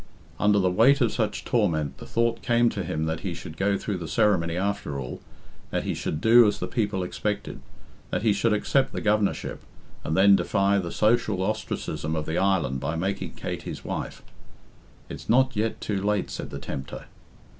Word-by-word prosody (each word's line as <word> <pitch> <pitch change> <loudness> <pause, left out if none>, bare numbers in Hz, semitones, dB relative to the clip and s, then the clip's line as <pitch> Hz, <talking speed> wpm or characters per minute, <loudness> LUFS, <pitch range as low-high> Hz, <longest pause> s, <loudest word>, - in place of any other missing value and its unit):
Under 105 0 +4
the 95 -2 +2
weight 125 +9 +5
of 120 -5 +2
such - - -2
torment 75 -3 0
the - - -10
thought 115 0 0
came 120 0 +3
to 100 - -3
him 80 -1 -2
that 80 0 -2
he - - -4
should 80 - -8
go 100 +3 +1
through 100 -1 -3
the 85 - -5
ceremony 85 -2 +2
after 100 -7 -2
all, 65 -2 -6 0.5
that - - -1
he - - -1
should 75 - -3
do 115 +4 +7
as 105 - 0
the - - -3
people 105 -5 -1
expected, 105 +3 -3 0.5
that - - -2
he 110 -3 +4
should 115 +3 +1
accept 130 +5 +1
the - - -2
Governorship, 105 -1 0 0.4
and 80 - -1
then 100 +1 +7
defy 100 +1 +2
the 85 -3 -3
social 110 -3 +2
ostracism 95 -6 -3
of 75 -1 -2
the 80 - -1
island 85 -9 +1
by 70 +4 -2
making 95 +4 -3
Kate - - -5
his - - -7
wife. - - -5 0.8
"It's - - -9
not 130 +2 +4
yet 110 +1 -1
too 100 -2 -2
late," 105 -1 0
said - - -5
the - - -6
tempter. 65 0 -6
100 Hz, 190 wpm, -26 LUFS, 85-110 Hz, 0.8 s, do